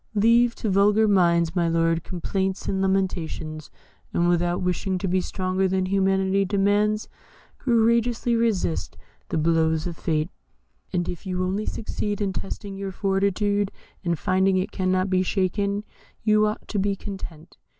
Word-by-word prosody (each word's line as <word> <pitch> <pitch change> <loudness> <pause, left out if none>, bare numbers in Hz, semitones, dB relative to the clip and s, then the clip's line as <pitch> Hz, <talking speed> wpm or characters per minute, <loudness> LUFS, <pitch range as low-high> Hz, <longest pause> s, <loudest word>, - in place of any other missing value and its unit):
Leave 230 +3 +4
to - - -4
vulgar 205 +2 +4
minds, 170 -4 +3
my 170 -2 +2
lord, 165 0 +1
complaints 190 +1 -2
and 190 -1 0
lamentations, 170 -5 -2 0.4
and 175 - +1
without 175 0 +1
wishing 185 +1 -1
to 190 - -2
be 185 +1 +1
stronger 185 +1 -1
than 190 0 0
humanity 195 0 +2
demands, 205 +2 +1 0.5
courageously 235 0 +2
resist 220 -8 0 0.3
the - - -1
blows 160 0 +2
of 175 -2 -4
fate, 155 0 -1 0.6
and 175 -1 -1
if 175 +2 -6
you 185 0 -1
only 195 +4 -2
succeed 210 -2 -3
in 200 -2 -1
testing 195 +1 -6
your 195 0 -4
fortitude, 200 +1 0 0.3
and 170 -2 0
finding 190 +3 +2
it 185 - -1
cannot 185 0 +1
be 185 -1 +2
shaken, 200 +2 0 0.4
you 215 -1 +4
ought 210 - -4
to 205 - -2
be 200 +1 +1
content. 185 -6 -9
190 Hz, 150 wpm, -24 LUFS, 175-205 Hz, 0.6 s, Leave